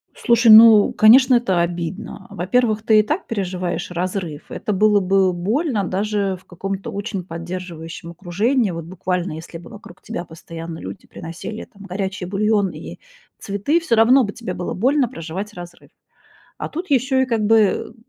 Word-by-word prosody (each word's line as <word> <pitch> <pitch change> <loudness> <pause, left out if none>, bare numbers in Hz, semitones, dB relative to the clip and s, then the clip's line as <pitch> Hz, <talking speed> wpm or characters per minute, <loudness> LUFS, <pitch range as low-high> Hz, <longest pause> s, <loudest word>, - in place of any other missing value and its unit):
Слушай, 235 -2 +4
ну, 220 -1 +8
конечно, 250 +4 +6
это 195 -8 +2
обидно. 175 +3 -5
Во-первых, 215 +4 0
ты 220 -1 +5
и - - +4
так 305 - -3
переживаешь 185 -5 -3
разрыв. 180 -3 -4
Это 210 - -3
было 210 +1 +4
бы 190 -1 +2
больно 215 - -1
даже 200 +1 -1
в - - -29
каком-то 195 +2 -5
очень 200 -2 -4
поддерживающем 170 -1 -7
окружении. 200 - 0
Вот 165 -1 -6
буквально, 180 0 -3
если 165 +2 -8
бы 170 - -13
вокруг 190 -3 -13
тебя 175 - -6
постоянно 165 0 -9
люди - - -9
приносили 170 +6 -8
там 200 -1 -17
горячий 190 0 -4
бульон 205 +1 +1
и - - -9 0.4
цветы, 205 - 0
всё 325 -9 0
равно 245 +4 +5
бы 205 -2 -4
тебе 225 -6 -6
было 180 0 -4
больно 260 +6 +2
проживать 195 -2 -7
разрыв. 175 -2 -11 0.7
А - - -4
тут 340 +2 -6
ещё 265 0 +2
и 260 - +2
как 230 -3 -1
бы, 220 -2 +2
195 Hz, 165 wpm, -20 LUFS, 175-225 Hz, 0.7 s, ну